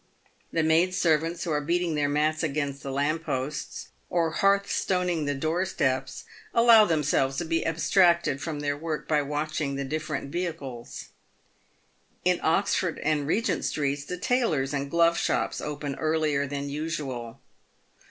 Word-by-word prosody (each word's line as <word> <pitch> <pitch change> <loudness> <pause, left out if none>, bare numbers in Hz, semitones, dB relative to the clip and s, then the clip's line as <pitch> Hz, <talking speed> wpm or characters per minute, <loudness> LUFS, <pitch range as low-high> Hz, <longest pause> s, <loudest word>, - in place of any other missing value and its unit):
The 165 - +1
maid 165 +4 +3
servants 165 0 +1
who 170 - -2
are 150 -1 +1
beating 170 +2 0
their 145 -1 +1
mats 155 +2 +1
against 145 -3 -2
the 135 - -5
lamp 150 +4 0
posts, 135 +1 -4 0.2
or 165 -2 +1
hearth 200 +3 +2
stoning 180 -4 0
the 145 0 -1
door 160 +6 0
steps, 130 -8 -1 0.3
allow 230 -2 +7
themselves 145 -5 +1
to 170 - -2
be 165 0 0
abstracted 170 -3 +3
from 155 -3 -4
their 145 -1 -1
work 155 +1 -4
by 150 -1 +2
watching 150 0 -2
the 140 - -2
different 155 -1 -4
vehicles. 140 -9 -5 1.2
In 180 -1 +3
Oxford 175 +1 +1
and 150 -2 +1
Begent 195 +1 0
streets, 145 -1 -1
the 180 +5 -5
tailors 180 - 0
and 140 0 -2
glove 170 +1 +3
shops - - -1
open 145 -1 -4
earlier 155 -3 +1
than 140 +1 -4
usual. 140 -6 -4
155 Hz, 150 wpm, -27 LUFS, 145-170 Hz, 1.2 s, allow